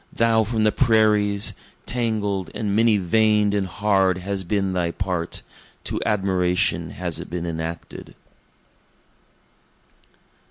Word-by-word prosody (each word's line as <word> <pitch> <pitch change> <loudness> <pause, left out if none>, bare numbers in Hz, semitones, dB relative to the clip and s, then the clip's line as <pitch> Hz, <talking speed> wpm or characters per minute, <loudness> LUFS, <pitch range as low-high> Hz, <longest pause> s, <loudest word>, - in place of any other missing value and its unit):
Thou 115 -1 +3
from 110 0 -1
the 110 - +4
prairies! 105 -4 +3 0.3
tangled 105 -6 -1
and 100 -2 -1
many 115 -1 +4
vein'd 105 +2 +2
and 100 -2 0
hard 95 -1 +1
has 95 +1 -4
been 95 +1 -1
thy 90 -2 0
part, 90 -1 -3 0.4
To - - -2
admiration 90 -5 +1
has 85 +1 -5
it - - -8
been 85 +1 -4
enacted! 80 0 -6
100 Hz, 115 wpm, -23 LUFS, 90-110 Hz, 0.4 s, the